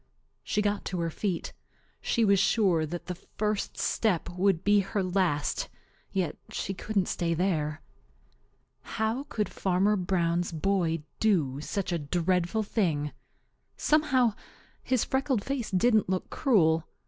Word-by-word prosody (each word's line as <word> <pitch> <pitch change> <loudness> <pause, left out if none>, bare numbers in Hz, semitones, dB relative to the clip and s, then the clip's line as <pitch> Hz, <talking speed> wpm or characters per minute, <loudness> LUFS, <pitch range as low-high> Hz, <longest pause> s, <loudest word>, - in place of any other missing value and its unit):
She 210 - 0
got 205 0 0
to 180 - -3
her 165 -1 -1
feet. 185 0 -3 0.5
She 230 -2 +2
was 200 -1 +4
sure 185 -6 +3
that 175 +3 -6
the 180 - -3
first 210 +3 -3
step 205 -7 0
would 180 -1 +1
be 205 0 +5
her 195 +1 -1
last, 180 -6 0 0.4
yet 185 -6 -1
she 195 - -3
couldn't 200 0 -1
stay 170 -1 -1
there. 155 -4 -1 1.1
How 225 +5 0
could 210 -2 -1
Fanner 195 +3 +1
Brown's 175 -2 0
boy 165 -2 0 0.2
do 155 -11 +2
such 195 +3 -3
a 170 - 0
dreadful 175 +6 0
thing? 160 -9 0 0.7
Somehow, 265 -7 +3 0.5
his 255 -3 +1
freckled 265 -5 0
face 275 -4 -2
didn't 215 +1 +3
look 185 -1 -2
cruel. 165 - +3
190 Hz, 135 wpm, -28 LUFS, 170-215 Hz, 1.1 s, be